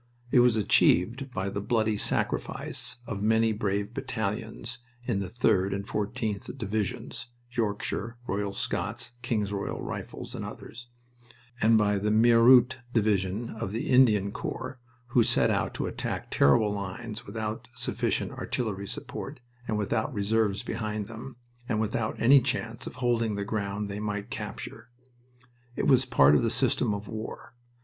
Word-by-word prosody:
It 130 - +6
was 120 -2 +5
achieved 115 +4 +3
by 100 -5 -2
the 100 - -3
bloody 110 0 +1
sacrifice 125 +4 -1
of 105 -4 -4
many 110 +1 +3
brave 105 0 -1
battalions 115 -2 -4 0.3
in 115 -6 0
the 95 -2 -3
3d 100 -4 +2
and 100 0 -4
14th 105 +2 -3
Divisions 115 +2 -3 0.2
(Yorkshire, 115 0 -2
Royal 100 -2 -1
Scots, - - -2
King's 105 -5 -1
Royal 100 -1 -3
Rifles, - - -6
and - - -5
others), 120 +1 -9 0.7
and 110 +1 +6
by 105 -1 +2
the 105 +2 0
Meerut 120 +3 +6
Division 105 -1 +1
of 110 -3 -4
the 115 - -2
Indian 110 -6 +5
Corps, 130 - -5 0.3
who 120 0 +4
set - - +3
out - - 0
to - - -2
attack - - -4
terrible 105 +10 +4
lines 105 +4 -5
without 110 +1 -4
sufficient 125 - -1
artillery 100 -5 -3
support, 135 +3 -6 0.3
and 110 - 0
without 105 +5 0
reserves 105 -1 +1
behind 110 -2 -3
them, 115 +4 -9 0.3
and 110 -3 +1
without 110 0 -1
any 135 +3 +7
chance 120 -3 -2
of - - -7
holding 120 -4 +1
the 100 0 -2
ground 100 -1 -2
they 100 +1 -5
might 105 -1 -3
capture. 110 +2 -6 0.9
It - - -1
was 130 -1 +5
part 75 - +5
of 75 - +5
the - - +2
system - - +2
of 100 +1 -7
war. 110 +1 -7
110 Hz, 150 wpm, -28 LUFS, 100-120 Hz, 0.9 s, any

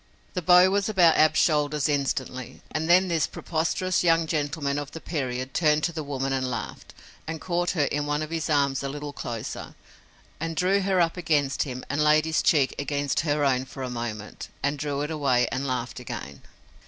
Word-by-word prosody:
The 180 - -2
bow 180 +2 +6
was 200 +1 +1
about 175 -6 +5
Ab's 155 0 +4
shoulders 150 -2 +2
instantly, 130 -3 -2
and 160 +1 -2
then 185 +2 +6
this 165 -3 +1
preposterous 170 +3 -1
young 165 -1 +3
gentleman 145 -2 -1
of 145 -1 -6
the 165 - -6
period 130 -5 -3
turned 150 -2 +2
to 170 - +1
the 160 - -3
woman 135 -1 -2
and 130 -1 -1
laughed, 115 -3 -6 0.3
and 160 0 -4
caught 175 +2 -1
her 150 - +3
in 145 +1 -1
one 150 +1 0
of 155 - -7
his 165 -1 -2
arms 140 -3 +2
a 140 - -3
little 145 +1 -6
closer, 115 -5 -6 0.6
and 165 +1 -3
drew 190 +4 +2
her 190 -1 +1
up 170 0 +2
against 150 -5 +1
him 125 0 -6
and 145 +2 0
laid 150 +1 +4
his 160 0 +1
cheek 140 -4 +3
against 145 -1 -1
her 145 -1 +1
own 130 -2 +2
for 135 0 -8
a 130 - -4
moment 115 -3 -5 0.2
and 140 +1 0
drew 145 -1 -2
it 150 +2 -3
away 135 -6 +2
and 135 +1 -2
laughed 130 -1 -3
again. 70 0 -7
150 Hz, 200 wpm, -26 LUFS, 135-165 Hz, 0.6 s, bow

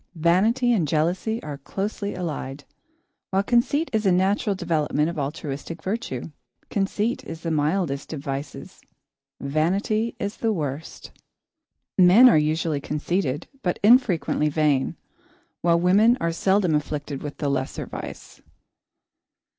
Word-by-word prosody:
Vanity 215 +10 +3
and 175 -9 +1
jealousy 175 +9 0
are 145 -2 -6
closely 200 +6 -4
allied, 145 -5 -5 0.7
while 195 +1 +1
conceit 250 +8 +2
is 220 -1 +1
a 195 - +3
natural 195 +3 +2
development 160 -4 0
of 170 - -6
altruistic 145 +2 -5
virtue. 185 - -4 0.4
Conceit 205 +4 -1
is 165 - -8
the 165 - -3
mildest 150 -2 -1
of 155 - -4
vices; 140 +3 -6 0.6
vanity 195 +10 0
is 200 +1 -4
the 225 - 0
worst. 150 -4 -5 0.9
Men 185 +8 +8
are 245 - +6
usually 155 -1 +1
conceited 150 0 -2
but 180 -6 -1
infrequently 200 - +4
vain, 150 0 +1 0.7
while 170 -1 +3
women 205 +7 +4
are 170 - 0
seldom 190 0 +2
afflicted 150 -1 -2
with 145 -1 -6
the 145 - -2
lesser 135 -1 -2
vice. - - -9
170 Hz, 125 wpm, -24 LUFS, 150-200 Hz, 0.9 s, Men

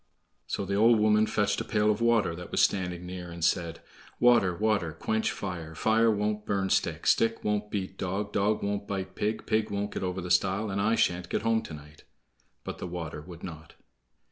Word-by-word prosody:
So 100 - -2
the 100 - -3
old 115 +3 +5
woman 105 0 +4
fetched 105 +1 0
a - - -2
pail 105 -1 +2
of 105 +2 -2
water 115 -7 +3
that 90 +1 -8
was - - -1
standing 90 -2 +1
near 90 -1 -7
and 85 -1 -3
said: 85 -2 0 0.4
"Water, 120 -6 +5
water, 105 -5 0
quench 110 +7 -1
fire; 85 -5 -6
Fire 110 +5 +3
won't 105 0 0
burn 95 -2 -1
stick; - - 0
Stick 115 0 +2
won't 105 0 -1
beat 95 -2 -4
dog; 100 +2 -3
Dog 105 +1 +1
won't 100 0 -2
bite 95 -2 -4
pig; 105 +2 -2
Pig 110 0 +1
won't 100 0 -2
get - - -4
over 90 0 -2
the 90 -1 -4
stile, 95 +4 +2
And 100 +1 -1
I 110 +3 +2
sha'n't 90 -4 0
get - - -1
home 115 0 +2
to 80 - -8
night." 75 0 -14 0.6
But - - -6
the - - -4
water 85 -3 -5
would 85 +1 -12
not. 80 -3 -9
100 Hz, 205 wpm, -28 LUFS, 90-105 Hz, 0.6 s, old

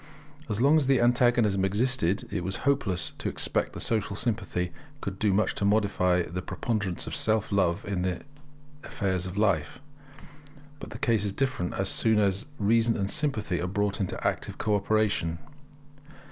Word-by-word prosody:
As 105 - -1
long 140 +5 +5
as 145 -4 +1
the 135 -2 +4
antagonism 120 -5 +3
existed, 100 -1 +1
it 85 - -2
was 95 +2 -3
hopeless 135 -11 +1
to - - -2
expect - - 0
that - - -7
Social 110 -3 -1
Sympathy 100 -6 -2 0.3
could 95 -5 -5
do 105 -2 +2
much 105 +3 +1
to - - -4
modify 100 -4 +2
the 85 +3 -5
preponderance 100 -2 -2
of - - -4
self 110 -1 +1
love 100 -1 +1
in 100 -3 -2
the 90 -1 -2 0.6
affairs 95 -2 -2
of 90 +2 -7
life. 90 -8 +1 1.0
But - - -8
the - - -8
case 115 -7 +1
is 100 -2 -1
different 125 -7 -1
as 95 - 0
soon 110 +1 +2
as 100 +4 +1
reason 115 +2 +2
and 100 -1 -2
sympathy 135 - -1
are 90 - -1
brought 100 +1 -1
into 95 -2 -2
active - - -3
co 105 - 0
operation. 100 -5 +1
100 Hz, 170 wpm, -27 LUFS, 95-115 Hz, 1.0 s, long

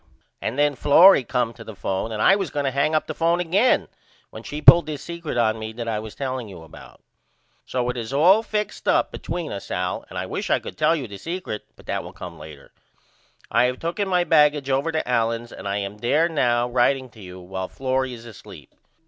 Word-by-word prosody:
And 120 - -3
then 145 0 +3
Florrie 150 +4 +6
come 125 -2 -1
to 115 - -12
the 110 -2 -10
phone 95 +3 -3
and 110 -1 -2
I 195 - +6
was 195 -5 -2
going 145 - -2
to 135 - 0
hang 140 +4 +1
up 155 - +1
the - - -5
phone 170 +1 +1
again 185 +8 +2 0.4
when - - -9
she 150 - -6
pulled 170 +2 +8
this 150 -2 -5
secret 170 -6 -5
on 110 -2 +1
me 110 0 -6
that 115 0 -6
I 110 -2 -1
was 110 -1 -9
telling 130 -4 -4
you 90 -4 -11
about. 80 - -15 0.6
So 125 -1 -1
it 125 - -2
is 115 0 -5
all 175 +10 +5
fixed 210 -2 -4
up - - +2
between 175 -3 -5
us 100 - -7
Al 90 0 -2
and - - -8
I - - -2
wish - - -4
I - - +4
could - - -9
tell 155 +2 +2
you 140 -6 -4
the 100 -2 -9
secret 170 - -5
but - - -18
that - - -3
will - - -10
come 85 -2 -9
later. 75 -2 -12 0.8
I 120 - +4
have 125 0 -1
tooken 175 +7 -2
my 180 -2 +2
baggage 150 -4 +3
over 140 +5 +1
to 160 -4 -2
Allen's 115 -1 -1
and - - -8
I 100 0 -1
am 100 +1 -5
there 145 +9 +2
now 120 -7 +1
writeing 130 +2 +1
to 110 - -15
you 90 -1 -10
while 95 +1 -5
Florrie 130 +1 -2
is 115 0 -13
asleep. 115 -4 -13
130 Hz, 230 wpm, -23 LUFS, 110-155 Hz, 0.8 s, pulled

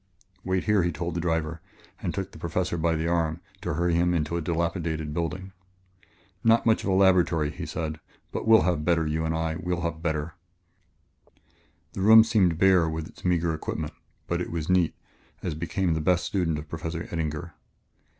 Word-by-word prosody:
"Wait 95 0 0
here," 105 -2 +3
he 85 0 0
told 85 +2 -4
the 85 - -2
driver 80 -1 -1 0.4
and - - -2
took - - -4
the - - -12
Professor 85 +1 -1
by 85 0 +1
the 80 +1 -1
arm 85 -1 0 0.2
to 85 -3 -2
hurry 85 +1 +1
him 90 +1 +2
into 80 0 -1
a 85 - -1
dilapidated 80 -2 -2
building. 90 +3 -3 0.9
"Not 115 0 +4
much 110 -1 +3
of - - -2
a - - +2
laboratory," 90 -5 +3
he - - -6
said, 80 -1 -4 0.3
"but - - -4
we'll 110 0 +7
have 85 -4 0
better, 80 -1 +2
you 80 +1 -1
and 80 0 -1
I; 80 0 -1
we'll 90 0 -2
have 85 -1 -3
better 80 -1 -2 0.8
" - - -37
The - - -4
room 110 +3 +9
seemed 95 -7 +2
bare 90 -3 +4
with 80 +1 -4
its - - -17
meager 85 -2 +1
equipment, 80 -1 -4 0.3
but 85 0 -1
it - - -4
was 85 +1 -2
neat, 90 -3 +3 0.5
as - - -2
became 85 +3 -1
the 80 - -1
best 90 +2 +2
student 85 -6 0
of 75 +1 -7
Professor 80 +2 -5
Eddinger. 80 0 -3
85 Hz, 190 wpm, -26 LUFS, 80-90 Hz, 0.9 s, room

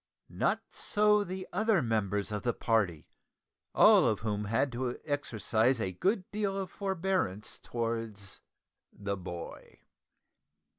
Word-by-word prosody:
Not - - 0
so 210 -1 +3
the 185 -1 -6
other 215 +1 +3
members 105 -3 0
of 105 -1 -2
the 120 +1 0
party, 100 -9 0 0.7
all - - +7
of 110 -3 0
whom 105 -1 -2
had 120 +6 +1
to 125 0 -2
exercise 120 -3 +1
a 95 -4 -1
good 190 - 0
deal 205 -2 -1
of 195 -1 -4
forbearance 185 - -1
towards 115 -4 -4 0.5
the 100 -1 -3
boy. 90 -2 -8
115 Hz, 120 wpm, -31 LUFS, -, 0.7 s, all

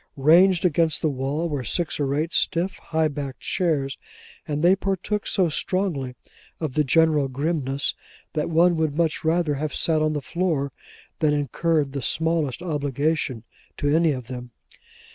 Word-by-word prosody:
Ranged 175 +6 +5
against 165 -2 +2
the 155 - +2
wall 140 +5 -2
were 145 -5 -3
six 160 - -1
or 140 -1 0
eight 160 +4 -1
stiff, 185 +2 +1
high 160 -1 0
backed 140 -3 -6
chairs, 150 -7 0 0.5
and 150 0 -2
they 180 +2 +6
partook 195 +2 -2
so 185 -3 +2
strongly 155 -6 -2 0.4
of 155 -5 -3
the 150 - +2
general 150 0 +3
grimness 140 0 -1 0.4
that 150 -1 -1
one 170 +2 +4
would 155 -2 -1
much 165 -2 0
rather 160 -1 +1
have 145 +1 -3
sat 160 -2 +2
on 155 0 +1
the 150 - -1
floor 160 -6 -1 0.5
than 155 -2 +3
incurred 150 +1 0
the 140 0 -4
smallest 160 0 0
obligation 145 -5 -1 0.3
to 145 +1 +1
any 165 -1 +4
of 130 -3 -4
them. 125 0 -7
155 Hz, 160 wpm, -24 LUFS, 140-170 Hz, 0.5 s, they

